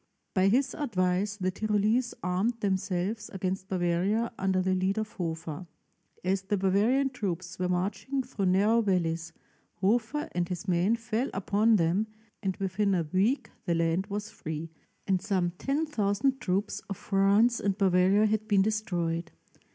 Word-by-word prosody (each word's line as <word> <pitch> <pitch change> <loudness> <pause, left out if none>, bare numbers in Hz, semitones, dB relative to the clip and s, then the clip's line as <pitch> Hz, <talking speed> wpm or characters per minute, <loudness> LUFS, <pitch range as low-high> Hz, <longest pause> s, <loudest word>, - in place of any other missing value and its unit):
By 190 0 +3
his 260 +7 +2
advice 200 - 0
the 185 -2 0
Tyrolese 215 +4 +1
armed 190 +7 0
themselves 195 +1 -1
against 190 0 -3
Bavaria 190 +5 0
under 190 -1 +1
the 185 0 +1
lead 190 +2 0
of 215 0 -2
Hofer. 165 -1 -5 0.6
As 190 +1 +1
the 200 +2 -1
Bavarian 215 +9 +2
troops 185 -8 -4
were 180 0 0
marching 205 +9 -1
through 200 -5 -2
narrow 205 +5 +4
valleys, 170 -5 0 0.4
Hofer 230 - 0
and 175 -1 -1
his 180 +2 -5
men 185 +5 +3
fell 230 +2 -2
upon 210 +3 +3
them, 185 +4 +2 0.3
and 190 -3 -2
within 195 0 0
a 170 -3 -1
week 215 +9 +1
the 170 -3 +1
land 165 +3 +1
was 205 0 -4
free, 160 +1 -6 0.3
and 190 -2 +1
some 190 -3 0
10,000 270 -4 0
troops 195 +3 -1
of 195 - -4
France 200 +4 +3
and 195 -1 0
Bavaria 190 +1 +4
had 215 0 0
been 200 -3 +4
destroyed. 175 -6 -1
195 Hz, 150 wpm, -29 LUFS, 180-215 Hz, 0.6 s, narrow